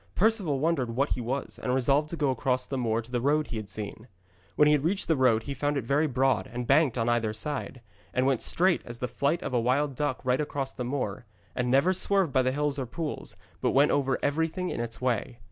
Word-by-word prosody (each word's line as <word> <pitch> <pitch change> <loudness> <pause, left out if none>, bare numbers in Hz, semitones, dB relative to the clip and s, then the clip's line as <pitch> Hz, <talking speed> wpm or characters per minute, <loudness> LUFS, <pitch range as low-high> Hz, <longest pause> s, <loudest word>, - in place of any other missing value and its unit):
Perceval 200 -8 +2
wondered 135 -6 0
what 140 +3 +1
he 125 - -1
was, 130 +4 -4
and 125 0 0
resolved 140 +4 +2
to 170 - -3
go 145 -3 +1
across 130 0 0
the 135 - -5
moor 115 -2 0
to 120 - -15
the 120 -1 -1
road 150 +3 +2
he 120 - -6
had 105 -2 -6
seen. 110 +2 -7 0.5
When 150 - +5
he 150 - +5
reached 165 +7 -1
the 160 - +3
road 125 -5 +3
he 140 - -4
found 145 +2 -1
it - - 0
was - - -13
very 150 +3 +3
broad, 135 0 +1
and 125 0 -4
banked 140 -1 +3
on 115 -1 0
either 115 -2 +1
side, 130 +2 -4 0.3
and 130 - +1
went 135 -3 +1
straight 180 0 +3
as 120 0 -8
the 125 0 -3
flight 145 +6 -1
of - - -4
a 120 - +3
wild 135 +4 +1
duck 145 0 -2
right 130 +2 +1
across 140 -2 -3
the 125 - -5
moor, 120 -4 -3 0.3
and 125 -1 -1
never 140 +9 +4
swerved 190 -4 +2
by 130 - +4
the 130 0 +1
hills 145 0 0
or 130 - -3
pools, 160 +4 -5 0.3
but - - +1
went 145 +2 +5
over 135 -2 +1
everything 160 +5 -1
in - - -3
its 115 -1 -4
way. 125 0 -1
135 Hz, 245 wpm, -28 LUFS, 125-150 Hz, 0.5 s, When